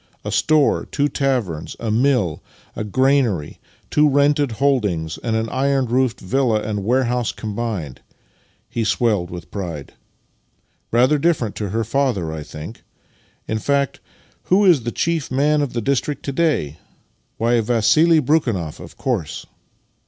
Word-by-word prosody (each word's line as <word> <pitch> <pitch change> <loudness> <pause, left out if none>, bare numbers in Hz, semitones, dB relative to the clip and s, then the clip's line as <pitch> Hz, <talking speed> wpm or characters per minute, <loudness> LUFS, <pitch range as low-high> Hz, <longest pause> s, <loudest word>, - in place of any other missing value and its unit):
A - - -3
store, 155 -3 +2
two 145 0 0
taverns, 120 - -2
a 115 -2 -2
mill, 120 - +1 0.3
a - - -3
granary, 120 - +1 0.3
two 150 0 +4
rented 145 -2 +2
holdings, 105 - 0
and 115 -2 -2
an 110 0 0
iron 135 0 +1
roofed 125 0 0
villa 120 +1 +1
and 105 -1 -3
warehouse 125 0 +1
combined." 105 - -5 0.7
He 115 - -2
swelled 105 -5 +1
with 90 -1 -9
pride. 85 -8 -6 0.5
" - - -44
Rather 130 +6 +3
dif 170 +2 +3
ferent 110 -4 -4
to 105 -2 -4
her 115 +4 -1
father, 115 - 0
I 80 - -5
think! 75 +8 -9 0.7
In 110 - -1
fact, 140 +1 0 0.5
who 200 +3 +3
is 170 -8 +5
the 120 - -1
chief 165 0 -1
man 145 +3 +2
in 145 - +1
tlic 120 -2 -4
district 140 +3 -1
to 140 - -2
day? 135 - 0 0.6
Why, 115 +1 +2
Vassili 150 +9 +4
Brekhunoff, 120 - 0
of - - -12
course! 105 - -3
120 Hz, 145 wpm, -20 LUFS, 105-140 Hz, 0.7 s, is